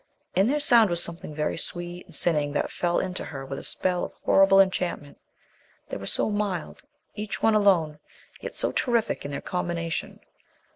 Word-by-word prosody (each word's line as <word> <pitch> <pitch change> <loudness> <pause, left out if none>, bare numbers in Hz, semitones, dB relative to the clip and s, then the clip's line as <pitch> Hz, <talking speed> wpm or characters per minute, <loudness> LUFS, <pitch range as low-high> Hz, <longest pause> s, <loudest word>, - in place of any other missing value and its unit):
In 195 +3 +4
their 295 +4 +1
sound 235 -7 +5
was 175 0 +3
something 165 -3 -5
very 150 0 -1
sweet 175 +1 -4
and 170 - -8
sinning 150 -2 +1
that - - -1
fell 175 -1 0
into 185 -1 -2
her 135 -3 -7
with 135 0 -5
a - - -10
spell 180 -1 0
of - - -5
horrible 195 0 +6
enchantment. 180 -6 0 0.7
They - - -4
were 100 0 -7
so - - +1
mild, 205 -5 -3 0.3
each 210 -1 -5
one 225 - +5
alone, 180 -8 +3 0.4
yet - - -7
so - - +1
terrific 235 - 0
in - - -4
their 140 - -4
combination. 170 -2 -3
175 Hz, 180 wpm, -26 LUFS, 155-195 Hz, 0.7 s, horrible